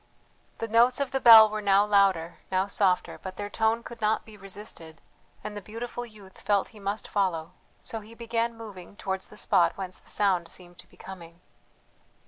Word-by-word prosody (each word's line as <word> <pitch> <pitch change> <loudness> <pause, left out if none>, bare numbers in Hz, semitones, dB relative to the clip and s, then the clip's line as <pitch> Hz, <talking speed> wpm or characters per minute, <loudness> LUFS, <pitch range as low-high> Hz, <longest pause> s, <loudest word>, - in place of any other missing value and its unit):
The 230 - -4
notes 235 +4 +4
of 280 -2 -1
the 270 - 0
bell 225 -3 +10
were 215 0 -4
now 200 0 +4
louder, 195 -5 +2
now 190 0 +2
softer; 195 -2 0
but 185 -1 -7
their 205 0 -6
tone 225 +2 +1
could 235 -1 -10
not 215 +1 +1
be 220 - -12
resisted, 195 -5 -8 0.4
and 210 - -6
the 205 - -6
beautiful 240 +4 -6
youth 205 -4 -16
felt 200 -2 +1
he 215 - -15
must 200 +2 -3
follow; 175 -5 -1 0.3
so 225 - -3
he 220 +2 -14
began 230 0 -2
moving 200 -5 -10
towards 190 -1 -4
the 210 - -13
spot 185 -4 +2
whence 185 -1 -5
the - - -14
sound 185 -5 +1
seemed 175 -1 -8
to 180 - -11
be - - -22
coming. 170 -3 -11
205 Hz, 190 wpm, -27 LUFS, 185-225 Hz, 0.4 s, bell